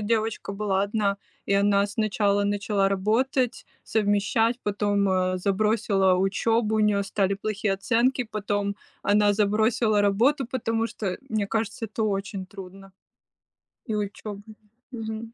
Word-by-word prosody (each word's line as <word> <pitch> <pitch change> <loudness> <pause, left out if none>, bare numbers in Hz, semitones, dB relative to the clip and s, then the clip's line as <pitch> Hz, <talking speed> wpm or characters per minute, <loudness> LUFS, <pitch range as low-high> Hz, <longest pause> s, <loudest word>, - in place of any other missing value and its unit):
девочка 220 -1 -1
была 200 -1 0
одна, 200 -1 0 0.3
и - - -1
она 200 0 +3
сначала 205 -1 +1
начала 205 -1 +1
работать, 230 +6 0 0.2
совмещать, 220 +2 +1
потом, 205 -1 +1
э, 185 0 +1
забросила 200 -1 +2
учебу, 215 +4 +1
у - - +1
нее 210 -1 +3
стали 195 0 0
плохие 205 0 -1
оценки, 240 +6 +1
потом 205 -2 -2 0.3
она 205 0 +3
забросила 215 +1 +2
работу, 230 +7 +2
потому 230 -3 -1
что, 215 - -6
э, 185 - -2
мне 215 -2 -1
кажется, 225 +1 -2
это 220 +1 -2
очень 195 -2 -3
трудно, 195 0 -11 0.9
и 220 - -2
учебу 205 0 -5 0.5
Мгм. 225 -1 -6
205 Hz, 130 wpm, -25 LUFS, 200-220 Hz, 0.9 s, она